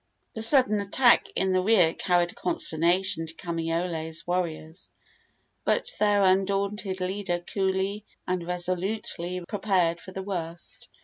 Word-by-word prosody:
The 220 - -5
sudden 225 -3 +7
attack 235 +5 +3
in 190 0 0
the 185 0 +2
rear 185 -5 +3
carried 175 -1 0
consternation 175 - 0
to 160 - -8
Kamaiole's 165 -1 -3
warriors; 170 -1 -4 0.7
but - - 0
their 205 -1 +3
undaunted 195 +1 0
leader 185 -1 -2
coolly 190 +3 -2 0.2
and 180 -1 -2
resolutely 180 0 -3
prepared 185 -5 0
for 185 - -11
the 190 0 -6
worst. 170 -3 -6
185 Hz, 120 wpm, -26 LUFS, 175-200 Hz, 0.7 s, sudden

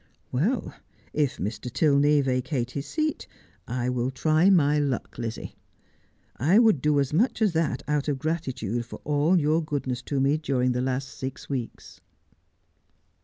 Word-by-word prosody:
'Well, 185 - 0 0.4
if 140 -3 0
Mr. 110 +5 -4
Tilney 145 +1 +4
vacate 130 -1 -1
his 140 +2 -5
seat 310 -1 -2 0.4
I 125 0 -2
will 125 0 0
try 155 +7 +3
my 150 -6 +4
luck, 140 -4 -2
Lizzie. 115 -1 -5 0.8
I 160 - +3
would 220 - +5
do 150 0 +3
as 140 0 -1
much 220 +11 +2
as 210 -5 +2
that 160 -6 0
out 150 -1 0
of 145 -2 0
gratitude 130 - -2
for - - -9
all 150 +5 +2
your 155 +2 +2
goodness 135 -5 -3
to 140 - 0
me 140 +3 +3
during 130 -5 0
the 125 0 -1
last 130 +1 -2
six 130 -1 -7
weeks.' 130 -5 -6
140 Hz, 155 wpm, -26 LUFS, 125-155 Hz, 0.8 s, would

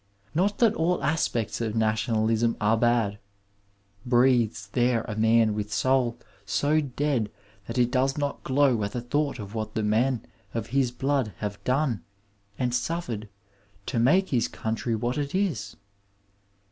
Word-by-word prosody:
Not 195 +5 +1
that 230 -3 +4
all 175 -1 0
aspects 120 -9 0
of 110 -2 -2
nationalism 110 +1 +1
are 105 +1 +3
bad. 115 -3 +1 0.8
Breathes 120 -4 +3
there 120 0 +2
a 110 - -5
mui 110 0 +3
with 105 0 -4
soul 120 +3 +1 0.3
so 145 +10 +1
dead 140 -5 -1 0.4
that 115 - -5
it 120 -1 +3
does 135 +1 +1
not 145 -1 -2
glow 130 -4 +3
at 100 0 -2
the 120 - -2
thought 145 +4 -1
of 105 -3 -8
what 110 -1 -4
the 110 - 0
men 115 +4 +1 0.3
of 115 -1 -3
his 135 -2 +3
blood 130 -3 -1
have 100 -1 -5
done 130 -4 +1 0.6
and 125 -1 -1
suffered 120 -5 -2 0.6
to 120 - -1
make 180 +11 +4
his 120 -3 +1
country 115 +1 -2
what 120 +5 -1
it 145 +3 -3
is 150 - -1
120 Hz, 150 wpm, -26 LUFS, 110-135 Hz, 0.8 s, that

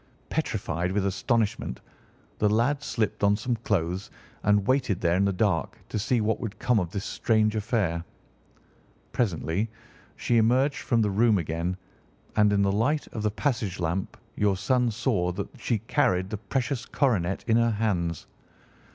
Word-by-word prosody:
Petrified 85 +3 -1
with 100 -1 +1
astonishment, 100 - 0 0.6
the 105 - +3
lad 120 +7 +2
slipped 110 -7 -2
on 100 0 +5
some 120 +3 -1
clothes 95 -4 -1 0.3
and 105 -1 +3
waited 130 -7 +1
there 85 0 +2
in 100 +2 +3
the 100 - +2
dark 95 -4 0
to 110 - -2
see 120 +4 +1
what 110 +1 0
would 110 -4 -5
come 125 -2 +2
of 90 -3 -2
this 100 +3 -4
strange 110 -2 +1
affair. 105 -6 0 1.1
Presently 100 -1 0 0.5
she 120 - +1
emerged 125 +6 +3
from 115 -3 +1
the 105 - +1
room 110 +1 +4
again, 85 +2 -2 0.6
and 105 -1 +4
in 100 -1 +3
the 100 - +2
light 130 +9 +1
of 110 - -5
the 105 - +1
passage 110 -5 -2
lamp 85 +3 -2 0.2
your 100 -2 +2
son 125 +5 +2
saw 105 -6 0
that - - -4
she 115 - 0
carried 95 -3 +1
the 105 - -2
precious 120 +4 -2
coronet 100 - 0
in 115 -1 +4
her 115 0 +3
hands. 95 -7 -1
105 Hz, 160 wpm, -27 LUFS, 95-115 Hz, 1.1 s, on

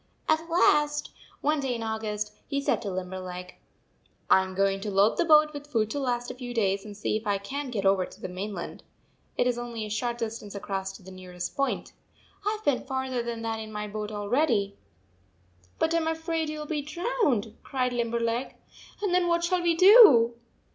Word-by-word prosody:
149 - - +4
At 330 -1 +4
last, 295 0 -4 0.3
one 300 +1 +1
day 265 -3 -1
in 230 - -4
August, 210 -1 -3
he 280 -1 -1
said 280 - 0
to 205 - -4
Limberleg: 180 -1 -6 0.4
" - - -39
I 190 - +7
am 190 0 -6
going 195 0 +1
to 210 - -3
load 200 +2 +3
the 345 - +3
boat 305 -1 +6
with 290 0 -8
food 220 -6 0
to 290 - -2
last 245 -2 -1
a - - -7
few 245 -1 -7
days 195 -3 +1
and 205 -1 -10
see 210 - -1
if 215 - -8
I 200 -1 +2
can 270 +9 -5
t - - -7
get 200 -3 -2
over 195 -1 +3
to - - -15
the - - -5
mainland. 185 0 -6 0.6
It - - +3
is 245 -1 0
only 235 -2 -5
a 210 - -7
short 235 +3 -1
distance 220 -3 -5
across 195 -1 -3
to 195 - -13
the 190 - -11
nearest 180 -1 -7
point. 275 0 -1 0.5
I 420 +1 0
Ve - - +5
been - - -10
farther 260 -2 -2
than 235 -1 -5
that 225 -1 -2
in 220 0 -7
my 210 0 -4
boat 210 0 -5
already." 210 -1 +1 0.5
" 90 0 -35
But 320 - +1
I - - +3
am 320 -1 0
afraid 320 0 -1
you 305 0 -4
11 - - -10
be 300 -2 -1
drowned," 290 - -1
cried 255 -2 -1
Limberleg, 235 +1 -1 0.5
"and 390 -3 +1
then 360 -1 +3
what 340 0 +2
shall 360 +1 +1
we 340 -1 +2
do?" 350 - +8
230 Hz, 215 wpm, -27 LUFS, 200-295 Hz, 0.6 s, do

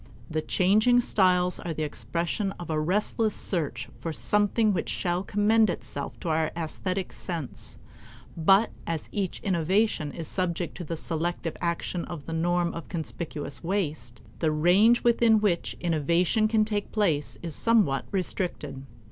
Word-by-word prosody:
The 155 0 0
changing 215 +9 +4
styles 180 -5 +2
are 170 -2 -4
the 155 - -2
expression 170 +6 -2
of 175 -2 -7
a 155 - +1
restless 210 +6 +1
search 170 -6 -2
for 165 - -3
something 210 +5 +2
which 175 - -2
shall 175 -1 -1
commend 210 +2 +3
itself 140 -4 -5
to 170 - -3
our 160 0 +2
aesthetic 185 +3 -3
sense; 165 -7 -5 0.6
but 195 +6 +4 0.2
as 165 -2 -3
each 195 -4 -2
innovation 185 -2 +1
is 165 -2 -6
subject 175 -3 -2
to 180 - -5
the 165 +1 -4
selective 165 +1 -3
action 170 0 -1
of 160 -5 -7
the 165 - -5
norm 175 +1 +1
of 165 - -7
conspicuous 160 -3 -5
waste, 160 - -2 0.2
the 160 - +2
range 180 +10 +4
within 235 -2 +5
which 195 -5 0
innovation 170 +6 +2
can 215 -1 +3
take 210 -1 -2
place 165 -10 +1
is 165 -2 -3
somewhat 210 - +2
restricted. 175 -7 -2
175 Hz, 150 wpm, -27 LUFS, 160-205 Hz, 0.6 s, within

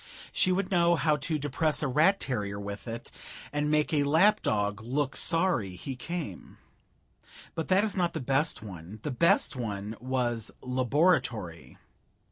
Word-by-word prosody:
She 185 - +2
would 185 +1 -1
know 170 -1 +4
how 155 -2 +2
to 155 +2 -1
depress 150 +2 0
a - - +1
rat 160 +9 +3
terrier 105 -6 -3
with 100 +2 -7
it 115 0 -6 0.4
and 145 0 0
make 150 +1 +1
a 150 - +3
lap 160 +9 +4
dog 105 -1 0
look 135 +4 -2
sorry 165 - +2
he 130 +8 -6
came. 125 - -6 1.0
But 160 - -3
that 190 +2 +4
is 215 -2 -1
not 175 -3 0
the 160 - -3
best 135 -3 0
one; 95 0 -9
the 150 - -2
best 150 +2 +3
one 105 -3 -4
was 120 -2 -1
Laboratory. 125 - 0
135 Hz, 155 wpm, -29 LUFS, 110-165 Hz, 1.0 s, know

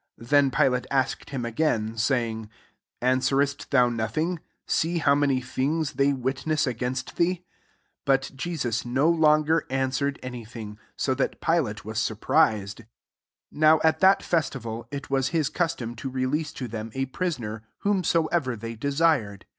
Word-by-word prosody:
4 115 - -12
Then 145 +2 +4
Pilate 130 -2 +1
asked 135 -2 -1
him 135 -4 -3
again, 115 -4 0
saying, 115 -2 0
^ - - -18 0.5
Answerest 135 +2 +1
thou 125 -3 +5
nothing 120 +10 -1 0.2
\ - - -51
see 170 +2 0
how 145 -3 +4
many 140 -2 +2
things 140 +5 -1
they 140 +1 +3
witness 135 +4 -1
against 125 +1 -3
thee. 170 +1 +3
S 185 - -5 0.7
But 135 -1 +2
Jesus 135 -7 -2
no 130 +5 +1
longer 160 -1 +3
answered 135 +1 0
any 125 -2 -6
thing: 110 -2 -9 0.3
ap 130 -1 +1
that 135 - -1
PUate 135 -12 0
was 110 0 -3
surprized.. 110 -2 +1
6 115 - -15 0.6
Now 155 +1 +5
at 160 0 +3
that 190 +1 +5
festival, 120 -9 -2
it 140 -1 -7
wa# 135 - +3
hi9 145 +3 0
custom 130 -9 -1
to 135 - -4
release 130 +4 -1
to 125 - -5
them 110 0 -5
a 135 0 0
prisoner, 130 -8 -3 0.2
whomsoever 170 -8 +1
they 115 +1 -6
de 140 +6 -3
sired. 140 - +1
135 Hz, 160 wpm, -26 LUFS, 120-155 Hz, 0.7 s, thou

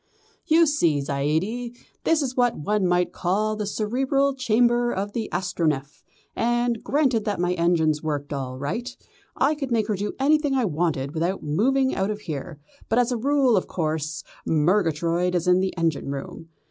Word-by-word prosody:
"You 330 +1 +5
see, 175 - +2
Zaidie, 160 - -2 0.3
this 320 -2 +3
is 255 -2 -3
what 245 -2 +2
one 200 +4 0
might 180 0 +1
call 210 +4 0
the 210 -1 -3
cerebral 265 +7 0
chamber 240 -1 +2
of 200 +2 -3
the 225 -2 -3
Astronef, 165 -6 -2 0.3
and, 240 -1 0
granted 265 -6 +1
that 205 -4 -1
my 180 0 +1
engines 165 -3 +2
worked 145 -2 -3
all 130 -2 -4
right, 230 - -4 0.4
I - - +2
could 280 -4 -5
make 225 -2 +2
her 210 - +1
do 205 +2 -3
anything 290 0 +2
I 255 -3 +2
wanted 155 -5 -1
without 170 +4 -1
moving 260 - +1
out 190 +1 -1
of 210 0 -4
here, 155 -3 -6 0.3
but 225 - +2
as 245 0 +3
a - - +1
rule, 270 0 +3
of 185 - 0
course, 155 -1 -2 0.2
Murgatroyd 170 +1 +1
is 175 0 0
in 180 0 +5
the 190 0 -2
engine 165 -4 -1
room. 140 +4 -6
195 Hz, 170 wpm, -24 LUFS, 160-245 Hz, 0.4 s, You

